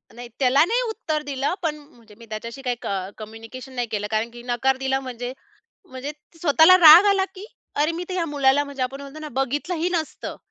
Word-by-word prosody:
नाही, 240 0 -9
त्याला 270 +3 +4
नाही 475 +6 +1
उत्तर 320 -9 -3
दिलं, 280 +3 -2
पण 305 -2 0
म्हणजे 235 -8 -19
मी 230 - -14
त्याच्याशी 230 +5 -7
काही 250 -2 -1
क - - -6 0.3
कम्युनिकेशन 225 +4 -10
नाही 245 -1 -2
केलं 210 -1 -2
कारण 220 +2 0
की 240 0 -11
नकार 255 +2 0
दिला 265 0 0
म्हणजे, 250 -1 -6 0.6
म्हणजे 260 +3 -6 0.3
स्वतःला 320 +3 +6
राग 330 +3 +10
आला, 390 -1 +2
की 390 +3 -9 0.3
अरे! 300 +3 +1
मी 350 +2 -4
तर 370 - -4
ह्या 345 -2 0
मुलाला 285 -1 +2
म्हणजे 280 -2 -5
आपण 270 +2 -3
म्हणतो 280 +2 -10
ना, 305 - -6
बघितलं 290 +7 -3
ही 335 +2 -1
नसतं. 320 -3 -4
275 Hz, 205 wpm, -23 LUFS, 245-315 Hz, 0.6 s, राग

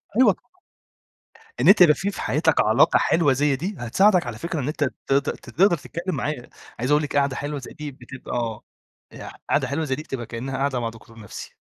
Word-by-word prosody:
أيوه 240 -4 +6
طبعًا، - - -25 1.2
إن - - +2
أنت 195 -1 +7
يبقى 150 -4 +8
في 200 +1 -2
في - - -7
حياتك - - +2
علاقة - - +4
حلوة 150 -5 +3
زي 140 +1 +1
دي 180 +8 -4
هتساعدك 180 - +3
على 115 -2 -5
فكرة 170 +3 -4
إن 135 - -3
أنت 150 0 -1
ت 135 0 -3
ت 140 +1 +2 0.2
تقدَر 180 0 +3
تتكلّم 175 +5 -5
معاه. 145 -4 -4 0.3
عايز 130 +4 -1
أقول 150 +1 +4
لِك 145 - -4
قعدة 140 -1 +1
حلوة 145 0 -4
زي 130 - -10
دي 150 -1 -7
بتبقى 120 -4 -5 0.5
أ - - -9 0.2
قعدة 135 -2 +2
حلوة 150 +4 -2
زي 130 -2 -1
دي 150 - -7
بتبقى 125 -5 -5
كأنها 130 +4 -5
قعدة 135 -2 0
مع 115 -1 -2
دكتور 115 0 -15
نفْسي. 105 - -9
140 Hz, 210 wpm, -23 LUFS, 125-160 Hz, 1.2 s, يبقى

